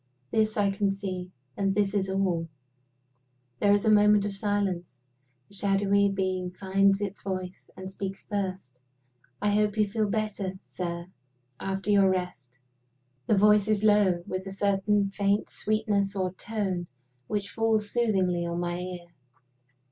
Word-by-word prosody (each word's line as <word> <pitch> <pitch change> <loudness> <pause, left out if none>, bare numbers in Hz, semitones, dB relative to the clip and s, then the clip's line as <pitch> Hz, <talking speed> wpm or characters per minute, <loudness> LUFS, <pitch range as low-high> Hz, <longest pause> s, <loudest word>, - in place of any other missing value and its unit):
This 215 -1 +1
I 200 -1 +3
can 200 0 0
see 185 -2 -4 0.2
and 195 -1 0
this 200 -1 +1
is 195 -2 0
all. 185 -4 0 1.1
There 205 - +4
is 205 +1 +3
a 220 - +5
moment 210 -1 +5
of 205 - -2
silence. 195 -7 -1 0.5
The - - -13
shadowy 200 0 +2
being 185 -2 -1
finds 195 +2 +2
its 200 -1 -4
voice, 185 -1 -5
and 190 0 -7
speaks 195 0 -6
first. 185 -11 -4 0.6
"I 205 - +3
hope 210 0 +1
you 210 -1 +3
feel 210 0 -1
better, 210 -3 -2
sir, 170 -2 -5 0.5
after 195 +1 -2
your 200 -2 +5
rest?" 180 -10 -3 0.7
The 215 - +3
voice 210 0 +5
is 215 -1 +1
low, 205 -5 +4
with 185 +1 -4
a - - -5
certain 200 +1 +1
faint 200 +1 0
sweetness 210 -2 0
or 185 -2 -1
tone 190 -4 -3 0.4
which 205 -1 -3
falls 220 -2 +1
soothingly 190 -7 +1
on 170 0 -3
my 175 0 -2
ear. 180 -1 -6
195 Hz, 150 wpm, -27 LUFS, 185-205 Hz, 1.1 s, a